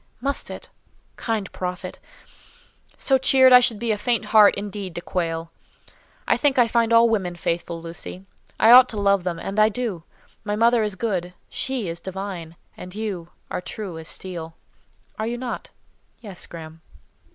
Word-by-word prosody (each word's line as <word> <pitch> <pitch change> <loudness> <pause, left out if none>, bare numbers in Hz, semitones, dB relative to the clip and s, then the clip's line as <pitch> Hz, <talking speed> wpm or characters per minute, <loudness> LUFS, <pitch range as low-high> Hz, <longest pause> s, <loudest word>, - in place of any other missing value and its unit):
"Must 275 +3 0
it? - - -8 0.5
Kind 220 -5 -3
prophet! 180 0 -5 1.0
So 265 -1 +2
cheered, 260 0 +6
I 250 - +11
should 240 -3 +3
be 235 +1 -1
a 210 - -1
faint 235 -1 0
heart 210 -1 +6
indeed 200 -3 -6
to 175 - -4
quail. 165 -2 -3 0.8
I - - +3
think 285 -3 +1
I 245 -2 +5
find 230 0 +1
all 230 0 +6
women 190 -6 -1
faithful, 170 0 -3
Lucy. 170 +3 -8 0.3
I 225 - +6
ought 255 +1 +9
to 220 - -6
love 200 -2 +3
them, 175 -2 -2
and 195 +5 -3
I 215 0 +6
do. 220 -6 -3 0.4
My 205 0 -2
mother 230 +2 +4
is 210 -2 -1
good; 180 -4 -3
she 260 -7 -3
is 170 0 -4
divine; 185 -3 -6 0.2
and 180 +1 -9
you 200 -6 -4 0.2
are - - -2
true 180 -3 -6
as 160 - -9
steel. 165 -3 -5 0.6
Are 220 - -1
you 240 +1 -3
not?" 245 0 -5 0.5
"Yes, 200 -6 -7
Graham." 160 -1 -10
200 Hz, 170 wpm, -23 LUFS, 175-230 Hz, 1.0 s, I